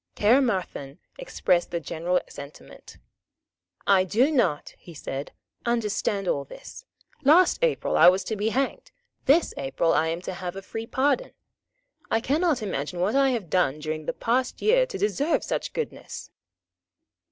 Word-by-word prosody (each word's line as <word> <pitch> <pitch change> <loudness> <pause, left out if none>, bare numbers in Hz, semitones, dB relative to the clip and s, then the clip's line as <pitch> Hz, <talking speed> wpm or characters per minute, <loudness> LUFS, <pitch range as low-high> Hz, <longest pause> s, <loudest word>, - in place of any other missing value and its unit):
Caermarthen 205 - +1 0.2
expressed 180 - 0
the 170 - -2
general 170 +3 -1
sentiment. 140 - -12 0.9
"I 195 -2 +5
do 230 - +2
not," 185 - 0
he 170 - -13
said, 140 -1 -5 0.3
"understand 210 -4 -1
all 140 -4 0
this. 320 - -12 0.4
Last 345 - +5
April - - +1
I - - +8
was 185 +1 +1
to 220 - -3
be 210 +2 0
hanged. 265 +4 -2 0.4
This 305 +5 +4
April 140 +5 0
I 160 - +2
am 165 +1 -2
to 185 - -4
have 180 0 -6
a 195 - -7
free 225 +3 -6
pardon. 285 - 0 0.8
I 225 - +2
cannot 295 +1 +1
imagine 175 -3 -3
what 185 +4 +1
I 275 0 +4
have 235 -8 -2
done 165 -6 +2
during 155 0 -5
the - - -1
past 250 +2 -1
year - - +3
to - - -6
deserve 215 - 0
such - - -3
goodness." 470 - -6
205 Hz, 150 wpm, -25 LUFS, 170-270 Hz, 0.9 s, I